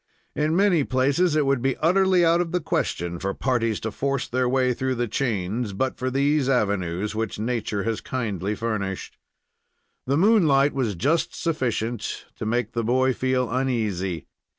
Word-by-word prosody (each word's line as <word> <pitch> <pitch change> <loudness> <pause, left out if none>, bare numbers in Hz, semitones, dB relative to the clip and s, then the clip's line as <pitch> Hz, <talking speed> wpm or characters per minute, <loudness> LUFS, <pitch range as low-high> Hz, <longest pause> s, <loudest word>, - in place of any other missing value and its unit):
In 155 +2 +1
many 185 -5 +3
places 140 +7 +2
it 150 -2 +2
would 135 -2 +1
be 135 0 0
utterly 185 +1 +3
out 165 +1 +4
of 170 -2 -3
the 180 - +2
question 85 - -2
for 100 +2 -2
parties 115 -4 0
to 110 - -3
force 140 +3 -2
their 125 0 0
way 130 -1 +2
through 130 +1 -1
the 120 0 -1
chains 110 -2 -2
but 130 +7 -1
for 130 - -2
these 140 +1 +1
avenues, 100 -5 0
which 110 -1 -3
nature 110 -2 -2
has 115 -1 -2
kindly 105 -5 -3
furnished. 100 -5 -3 0.9
The 140 +2 +2
moonlight 160 -8 +4
was 120 -7 -1
just 150 - 0
sufficient 120 -8 -2
to 110 - -4
make 120 0 0
the 115 - -2
boy 130 +3 +2
feel 130 0 0
uneasy. 105 - -1
125 Hz, 165 wpm, -24 LUFS, 110-140 Hz, 0.9 s, out